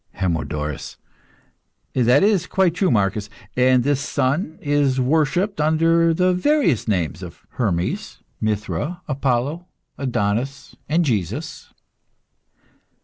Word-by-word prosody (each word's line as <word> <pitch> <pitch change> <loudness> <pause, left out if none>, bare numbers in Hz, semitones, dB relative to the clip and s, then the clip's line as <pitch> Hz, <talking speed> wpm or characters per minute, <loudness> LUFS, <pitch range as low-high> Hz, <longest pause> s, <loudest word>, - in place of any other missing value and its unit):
HERMODORUS. 75 -5 -3 1.0
That 125 +4 +4
is 205 -4 +2
quite 190 -4 +2
true, 185 +1 +1
Marcus; 105 -2 0 0.3
and 125 0 +4
this 145 0 +1
Son 145 +4 -1
is 145 -3 +1
worshipped 160 +8 +1
under 165 +2 +3
the 180 +2 +2
various 180 - +2
names 85 -6 -1
of 90 0 -10
Hermes, 90 -7 -2 0.2
Mithra, 110 - -2
Adonis, 140 +4 -1 0.3
Apollo, 125 +2 -2
and 165 +3 +2
Jesus. 115 - -3
135 Hz, 100 wpm, -21 LUFS, 105-165 Hz, 1.0 s, That